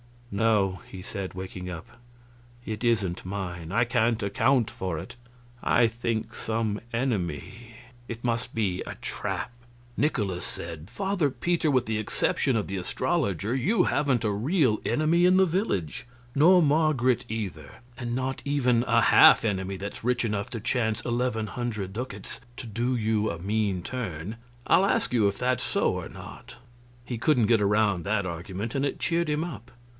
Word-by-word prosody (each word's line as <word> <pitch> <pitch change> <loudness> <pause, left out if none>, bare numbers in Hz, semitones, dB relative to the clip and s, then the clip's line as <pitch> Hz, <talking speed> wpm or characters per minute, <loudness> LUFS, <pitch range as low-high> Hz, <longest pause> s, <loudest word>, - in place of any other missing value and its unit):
"No," 100 -3 +2
he 95 - -8
said, 95 0 -5
waking 90 -1 -6
up, 85 -2 -6 0.8
"it 110 +1 -4
isn't 100 -7 0
mine. 90 -4 -5
I 120 - +4
can't 115 -1 +1
account 120 +4 +2
for 90 -4 -3
it. 80 - -8 0.5
I 120 -1 +4
think 115 -1 -3
some 110 -2 -2
enemy... 115 - -3 0.3
it 115 0 -7
must 115 0 -2
be 100 -5 0
a - - -5
trap." - - -4 0.5
Nikolaus 105 - 0
said: 80 +2 -7
"Father 190 - 0
Peter, 170 +3 0
with 130 -3 +2
the 110 0 -1
exception 115 +4 0
of 105 - 0
the 95 - -3
astrologer 110 - -1
you 180 - +2
haven't 135 -5 +1
a 105 - +1
real 125 - +2
enemy 165 +3 +3
in 180 +1 +5
the 190 - +6
village 160 - -2 0.3
nor 175 +5 +6
Marget, 145 -5 +2
either. 95 -10 -5 0.2
And 120 -2 -3
not 130 +1 -2
even 125 -4 +2
a 115 0 +4
half 115 - +7
enemy 95 -3 -1
that's 100 +3 -7
rich 125 +1 +1
enough 105 -2 -2
to 115 - -5
chance 110 -1 0
eleven 120 -2 -1
hundred 110 -4 -4
ducats 125 +5 -5 0.2
to 130 - -7
do 120 +3 -1
you 110 -2 +1
a 85 - -3
mean 100 0 -1
turn. 105 -4 -5 0.3
I'll 190 - +5
ask - - +1
you 110 -4 +4
if 100 - -1
that's 125 -1 0
so - - +1
or - - -5
not?" - - -11 0.5
He 120 -1 -4
couldn't 125 -4 +3
get 115 -3 +4
around 100 -3 +2
that 100 -1 +1
argument, 95 +5 -5
and 135 0 0
it 140 - -2
cheered 170 -1 0
him 150 +1 0
up. 120 - -7
115 Hz, 165 wpm, -27 LUFS, 100-130 Hz, 0.8 s, half